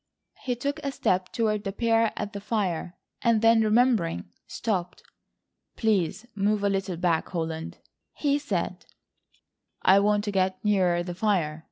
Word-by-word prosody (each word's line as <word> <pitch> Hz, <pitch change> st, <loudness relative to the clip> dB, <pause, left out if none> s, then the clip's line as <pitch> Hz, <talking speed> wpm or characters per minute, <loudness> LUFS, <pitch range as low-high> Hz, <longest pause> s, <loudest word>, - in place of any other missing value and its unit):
He 250 Hz, -1 st, -1 dB
took 280 Hz, +4 st, -3 dB
a 280 Hz, -, -2 dB
step 185 Hz, -7 st, 0 dB
toward 215 Hz, -2 st, 0 dB
the 195 Hz, -, -3 dB
pair 225 Hz, +1 st, +2 dB
at 205 Hz, 0 st, -4 dB
the 200 Hz, -, -6 dB
fire, 190 Hz, -5 st, -2 dB, 0.2 s
and 230 Hz, -2 st, +2 dB
then 225 Hz, 0 st, +6 dB
remembering, 215 Hz, -, +2 dB, 0.2 s
stopped. 180 Hz, -6 st, -3 dB, 0.7 s
"Please 210 Hz, -1 st, 0 dB
move 205 Hz, +1 st, 0 dB
a 200 Hz, -, +3 dB
little 195 Hz, -2 st, -2 dB
back, 170 Hz, -2 st, 0 dB
Holland," 160 Hz, -2 st, -4 dB, 0.4 s
he 285 Hz, -1 st, +1 dB
said, 290 Hz, -, -3 dB, 1.0 s
"I 190 Hz, +1 st, +6 dB
want 205 Hz, 0 st, +2 dB
to 205 Hz, -, -2 dB
get 190 Hz, -1 st, +1 dB
nearer 180 Hz, -4 st, +2 dB
the 175 Hz, 0 st, -5 dB
fire. 175 Hz, -6 st, 0 dB
200 Hz, 150 wpm, -26 LUFS, 180-225 Hz, 1.0 s, then